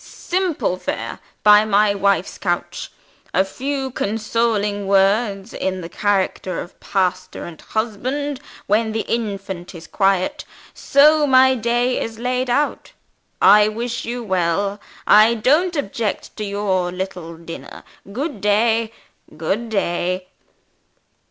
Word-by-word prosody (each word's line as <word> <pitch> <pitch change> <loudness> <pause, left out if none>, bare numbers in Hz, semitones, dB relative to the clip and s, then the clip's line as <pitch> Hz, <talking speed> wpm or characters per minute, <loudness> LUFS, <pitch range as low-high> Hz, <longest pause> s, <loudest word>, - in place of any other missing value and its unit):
Simple 350 - -2
fare, - - -4 0.2
by 210 0 +7
my 210 -1 +3
wife's 200 -2 0
couch; 175 -2 -3 0.4
a 190 - +4
few 265 +6 -3
consoling 215 -2 -1
words, 195 +1 +2
in 185 -1 -2
the 165 - -7
character 190 -1 -1
of 175 - -9
pastor 185 -2 -2
and 165 -3 -10
husband, 255 +6 -3 0.3
when 220 +2 +1
the 220 - 0
infant 195 -6 -4
is 165 -1 -10
quiet. 195 - 0 0.3
So 300 +2 +4
my 260 0 +6
day 240 +1 0
is 225 -1 -5
laid 250 +2 -1
out. 290 +5 -1 0.5
I 210 0 +7
wish 235 +3 -3
you 240 +1 -4
well. 190 +1 0 0.2
I 215 +2 +6
don't 305 +11 +2
object 225 -6 -3
to 215 - -3
your 195 -3 -1
little 180 -3 -6
dinner. 165 0 -10 0.3
Good 260 - -4
day! 220 +2 +2 0.5
good 205 +9 -2
day!" 185 -2 -1
210 Hz, 120 wpm, -20 LUFS, 190-240 Hz, 0.5 s, by